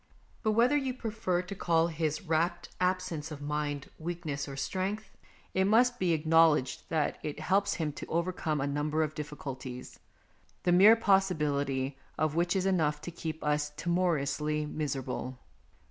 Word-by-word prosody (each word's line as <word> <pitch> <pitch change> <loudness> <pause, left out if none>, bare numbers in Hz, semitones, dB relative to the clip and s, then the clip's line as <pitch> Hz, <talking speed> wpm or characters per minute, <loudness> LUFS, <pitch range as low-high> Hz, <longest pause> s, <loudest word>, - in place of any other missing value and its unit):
But 215 -2 +1
whether 240 +6 +4
you 265 -3 0
prefer 210 -7 -1
to 180 - -6
call 165 -3 +2
his 155 +1 -2
rapt 170 +1 0
absence 180 -4 0
of 150 -2 -7
mind 145 -1 -3
weakness 160 -4 -4
or 135 -1 -7
strength, 195 +6 -3 0.4
it 190 0 +2
must 245 +4 +4
be 175 -3 +2
acknow 160 +1 +5
ledged 130 -2 -5
that 155 -2 0
it 150 0 -5
helps 195 +5 +1
him 155 -3 -1
to - - -8
overcome 170 -2 -1
a 135 - 0
number 150 +2 0
of 155 0 -3
difficulties, 135 -4 -7 0.6
the 175 - +3
mere 200 +6 +8
possibility 145 -10 +1 0.2
of 155 -1 +1
which 175 +2 +1
is 190 -1 +1
enough 160 -6 +2
to 175 - -6
keep 160 -1 -5
us 150 0 +1
timorously 150 -4 0
miser 150 -2 -2
able. 130 0 -5
160 Hz, 160 wpm, -30 LUFS, 150-185 Hz, 0.6 s, mere